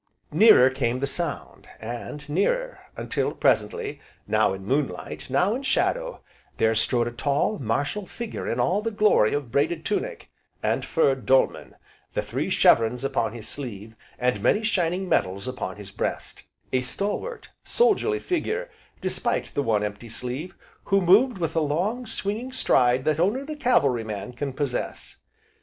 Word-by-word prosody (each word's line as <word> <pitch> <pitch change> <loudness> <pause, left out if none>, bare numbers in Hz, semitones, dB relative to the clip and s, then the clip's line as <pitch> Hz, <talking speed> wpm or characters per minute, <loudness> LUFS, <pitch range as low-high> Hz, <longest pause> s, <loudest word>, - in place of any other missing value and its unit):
Nearer 135 - +7
came 125 -2 -1
the 135 - -1
sound, 155 +2 -4
and 120 +6 -6
nearer, - - 0 0.2
until, - - -1
presently, 455 -2 0 0.2
now 110 -1 +2
in 95 0 -6
moonlight, 135 +4 -2
now 180 +10 +2
in 255 - -3
shadow, - - 0 0.3
there 110 0 +3
strode 120 +2 +1
a - - -3
tall, 140 - 0
martial 145 - -1
figure 235 -2 -5
in - - -1
all 195 +4 +2
the 225 - -1
glory 210 - +3
of 140 -5 -4
braided 155 +4 0
tunic, 475 - -3 0.3
and - - +1
furred 135 -6 +1
dolman, 135 0 +2 0.4
the - - 0
three - - -3
chevrons 115 +3 +4
upon 130 -5 0
his 110 -2 -8
sleeve, 110 -6 -7 0.2
and 125 0 0
many 215 - +3
shining 190 -3 0
medals 100 - 0
upon 110 -7 -4
his 105 -1 -10
breast, - - -4 0.3
a 130 - +3
stalwart, 205 - -3
soldierly 435 -2 +2
figure, 440 +8 -2 0.3
despite - - -1
the 145 - 0
one 110 -5 +1
empty 105 +3 -5
sleeve, 125 +9 -5 0.3
who 195 0 +3
moved 200 +6 +5
with 165 -3 -2
the 165 - +1
long, 190 +12 -1
swinging 220 +3 -3
stride 125 - +2
that 155 0 +1
only 210 +10 +1
the 305 +2 -6
cavalry 140 - +2
man 105 +2 -6
can 140 +3 -3
possess. 130 -2 -4
145 Hz, 155 wpm, -25 LUFS, -, 0.4 s, Nearer